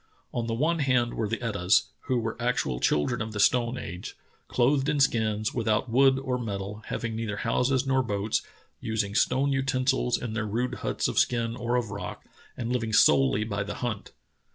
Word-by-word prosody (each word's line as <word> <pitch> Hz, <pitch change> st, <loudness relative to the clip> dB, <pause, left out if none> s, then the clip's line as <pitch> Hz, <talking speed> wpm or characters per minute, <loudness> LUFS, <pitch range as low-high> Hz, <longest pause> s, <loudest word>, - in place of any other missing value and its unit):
On 115 Hz, -1 st, -2 dB
the 115 Hz, -, -1 dB
one 160 Hz, +7 st, +1 dB
hand 125 Hz, -4 st, +2 dB
were 110 Hz, -, -1 dB
the 115 Hz, +3 st, -3 dB
Etahs, 100 Hz, -4 st, +2 dB, 0.2 s
who 130 Hz, -2 st, +1 dB
were 115 Hz, -1 st, -2 dB
actual 120 Hz, -, 0 dB
children 95 Hz, -, +1 dB
of 110 Hz, -1 st, -4 dB
the 105 Hz, -, -4 dB
stone 120 Hz, +4 st, +3 dB
age 90 Hz, -2 st, -7 dB, 0.2 s
— -, -, -37 dB
clothed 135 Hz, +3 st, +2 dB
in 150 Hz, -1 st, +1 dB
skins, 110 Hz, -5 st, +1 dB
without 115 Hz, 0 st, 0 dB
wood 135 Hz, +2 st, +5 dB
or 130 Hz, -2 st, -2 dB
metal, 105 Hz, -2 st, -5 dB
having 115 Hz, -1 st, -3 dB
neither 110 Hz, -3 st, -3 dB
houses 130 Hz, +3 st, +1 dB
nor 135 Hz, -1 st, +2 dB
boats, 105 Hz, -2 st, -1 dB, 0.4 s
using 110 Hz, -2 st, -2 dB
stone 135 Hz, +5 st, +2 dB
utensils 130 Hz, -1 st, +1 dB
in 120 Hz, -3 st, -5 dB
their 110 Hz, -1 st, -2 dB
rude 120 Hz, +4 st, -1 dB
huts -, -, -1 dB
of -, -, +1 dB
skin 115 Hz, -1 st, +1 dB
or 120 Hz, 0 st, -1 dB
of 120 Hz, -4 st, -1 dB
rock, 100 Hz, -4 st, -6 dB, 0.3 s
and 120 Hz, 0 st, -2 dB
living 115 Hz, -3 st, -1 dB
solely 110 Hz, +1 st, +5 dB
by 100 Hz, -2 st, -3 dB
the 105 Hz, +1 st, -4 dB
hunt. 120 Hz, -5 st, -4 dB
115 Hz, 190 wpm, -27 LUFS, 110-130 Hz, 0.4 s, wood